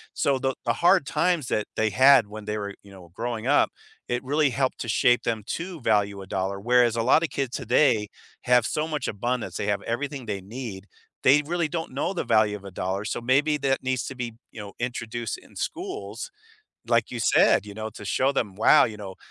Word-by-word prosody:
So 135 -2 +1
the, 135 0 -1
the 115 - +2
hard 175 +3 +4
times 175 -6 0
that 105 - -1
they 110 -1 +1
had 130 0 +6
when 105 0 -9
they 105 0 -2
were, 100 -1 -4
you 100 - -15
know, 90 -3 -14
growing 115 +1 -4
up, 145 - +4 0.4
it 120 +1 -1
really 145 +2 +2
helped 130 +1 -1
to 115 - -4
shape 120 +3 +3
them 110 -2 -2
to 175 +3 -4
value 100 -3 +1
a - - -13
dollar, 95 +1 -2
whereas 120 +1 +3
a 115 - 0
lot 130 +6 +5
of 165 - -1
kids 135 -3 -3
today 120 -4 +2 0.4
have 125 -2 +4
so 155 +4 -1
much 150 -2 -3
abundance, 120 +4 -3
they 105 - -3
have 100 -1 0
everything 135 +2 -3
they 100 -3 -4
need, 105 -2 -8 0.4
they 145 +3 +5
really 170 0 0
don't 165 -2 -4
know 145 +8 -1
the - - -1
value 110 -2 +3
of 100 - -16
a 100 - -8
dollar, 95 +3 -3
so - - -3
maybe 140 +5 +2
that 135 -2 0
needs 130 -1 -1
to 135 - -6
be, 120 -2 -5 0.2
you 110 - -8
know, 100 -1 -9
introduced 120 - -4
in 365 - -19
schools, 390 +7 -5 0.6
like, 115 -1 +2
you 120 -2 -4
said, 105 - +4
you 100 - -9
know, 110 +1 -5
to 105 - -11
show 130 +7 +1
them, 105 -8 -2
"Wow, 105 - +6
you 110 - -4
know, 100 -3 -8
120 Hz, 220 wpm, -25 LUFS, 105-140 Hz, 0.6 s, had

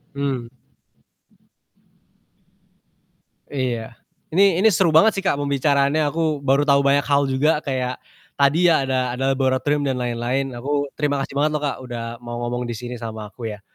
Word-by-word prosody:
Mmm. 135 -4 -2 3.0
Iya, 120 -5 -3 0.3
Ini 185 +1 +4
ini 220 - +6
seru 175 -3 +2
banget 200 +7 +5
sih 195 - -2
Kak 145 - +1
pembicaraannya, 140 +1 +1
aku 155 -1 -1
baru 135 +1 +3
tahu 140 0 +5
banyak 140 +1 +4
hal 140 0 +3
juga 135 +4 +2
kayak 130 -2 -2 0.4
tadi 150 +6 +4
ya 155 -5 +3
ada 130 -1 0
ada 135 - -3
laboratorium 135 +2 +1
dan 130 - -1
lain-lain, 125 +2 -2
aku 145 +4 -1
terima 145 -1 0
kasih - - -8
banget 150 +1 +2
loh 150 - -7
Kak, 145 - -1
udah 120 -2 -6 0.2
mau 120 0 -6
ngomong 120 +1 -2
di 120 - -3
sini 125 +1 -6
sama 110 -2 -6
aku, 115 -3 -6
ya. - - -21
140 Hz, 160 wpm, -21 LUFS, 125-145 Hz, 3.0 s, ini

